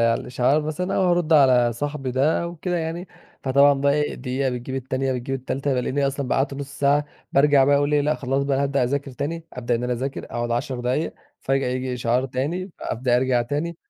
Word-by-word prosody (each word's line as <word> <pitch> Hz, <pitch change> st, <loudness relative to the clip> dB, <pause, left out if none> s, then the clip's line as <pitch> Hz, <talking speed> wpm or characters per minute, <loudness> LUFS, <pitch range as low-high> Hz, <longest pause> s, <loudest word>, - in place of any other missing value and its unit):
على 115 Hz, 0 st, +3 dB
الإشعار 130 Hz, +4 st, +1 dB
مثلًا 155 Hz, +5 st, -2 dB
أو -, -, +2 dB
هارد 175 Hz, -2 st, +2 dB
على 125 Hz, -5 st, +5 dB
صاحبي 145 Hz, +1 st, -3 dB
ده 135 Hz, +7 st, +2 dB
أو 170 Hz, 0 st, -5 dB
كده 175 Hz, +2 st, -2 dB
يعني، 170 Hz, +2 st, -4 dB, 0.3 s
فطبعًا 140 Hz, +2 st, +5 dB
بقى 140 Hz, +1 st, +2 dB
إيه؟ 150 Hz, 0 st, 0 dB
دقيقة 130 Hz, +1 st, -2 dB
بتجيب 125 Hz, +1 st, -5 dB
التانية، 130 Hz, 0 st, -1 dB
بتجيب 130 Hz, +2 st, -3 dB
التالتة، 135 Hz, +1 st, -2 dB
بالاقيني 130 Hz, +3 st, 0 dB
أصلًا 135 Hz, -1 st, -3 dB
بقى -, -, +1 dB
قعدت 135 Hz, +1 st, 0 dB
نص 140 Hz, 0 st, -7 dB
ساعة. 145 Hz, +1 st, +3 dB, 0.3 s
بارجع 140 Hz, -1 st, +5 dB
بقى 140 Hz, +1 st, +4 dB
أقول 145 Hz, +1 st, +1 dB
إيه؟ 145 Hz, -, +4 dB
لأ، 150 Hz, +2 st, +1 dB
خلاص 135 Hz, 0 st, -1 dB
بقى 140 Hz, -1 st, +1 dB
أنا 140 Hz, -, +1 dB
هابدأ 140 Hz, -2 st, +1 dB
أذاكر 140 Hz, +2 st, -2 dB
تاني، 160 Hz, +5 st, -4 dB
أبدأ 125 Hz, -1 st, -1 dB
إن 120 Hz, +1 st, -1 dB
أنا 125 Hz, -, -1 dB
أذاكر، 130 Hz, +3 st, -3 dB
أقعد 120 Hz, 0 st, -4 dB
10 125 Hz, +2 st, -2 dB
دقايق، 125 Hz, +6 st, -1 dB, 0.3 s
فجآة 135 Hz, -1 st, 0 dB
ييجي 130 Hz, 0 st, -2 dB
إشعار 125 Hz, +2 st, 0 dB
تاني، 150 Hz, +9 st, -3 dB
فأبدأ 120 Hz, +1 st, 0 dB
أرجع 125 Hz, -1 st, +2 dB
تاني. 150 Hz, +7 st, -3 dB
135 Hz, 215 wpm, -23 LUFS, 125-145 Hz, 0.3 s, على